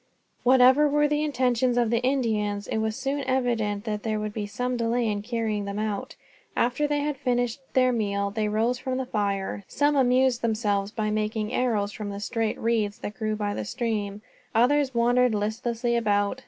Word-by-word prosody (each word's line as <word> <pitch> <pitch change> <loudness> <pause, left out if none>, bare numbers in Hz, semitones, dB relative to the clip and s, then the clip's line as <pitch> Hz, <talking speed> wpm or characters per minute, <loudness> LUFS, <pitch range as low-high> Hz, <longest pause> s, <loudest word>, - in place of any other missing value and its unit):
Whatever 260 +3 +6
were 295 +1 +3
the 295 +1 0
intentions 250 -3 +1
of 235 -2 +2
the 235 0 +2
Indians, 220 -6 0
it 220 - -1
was 220 0 -1
soon 275 +2 -2
evident 235 -6 0
that 210 -2 -3
there 215 -1 -1
would 210 0 -4
be 210 -2 -3
some 250 +4 -2
delay 235 0 0
in 205 -1 -1
carrying 220 -2 -2
them 200 0 -4
out. 210 -2 -3 0.4
After 250 +5 +1
they 290 0 0
had 295 -1 -2
finished 245 -2 0
their 255 -1 +4
meal, 200 -3 -1
they 215 +1 -1
rose 230 +4 0
from 255 0 -3
the 265 - -2
fire. 200 -4 -2
Some 290 +1 +1
amused 255 -2 +3
themselves 210 -3 0
by 215 0 -2
making 215 0 -1
arrows 215 -5 0
from 210 0 -6
the 200 0 -5
straight 225 +1 -1
reeds 220 -3 0
that 205 - -6
grew 215 -1 -2
by 205 -1 -2
the - - -3
stream. 210 -2 -3 0.3
Others 265 +3 +3
wandered 245 0 +3
listlessly 230 +3 -1
about. 205 +1 +1
230 Hz, 185 wpm, -26 LUFS, 210-250 Hz, 0.4 s, Whatever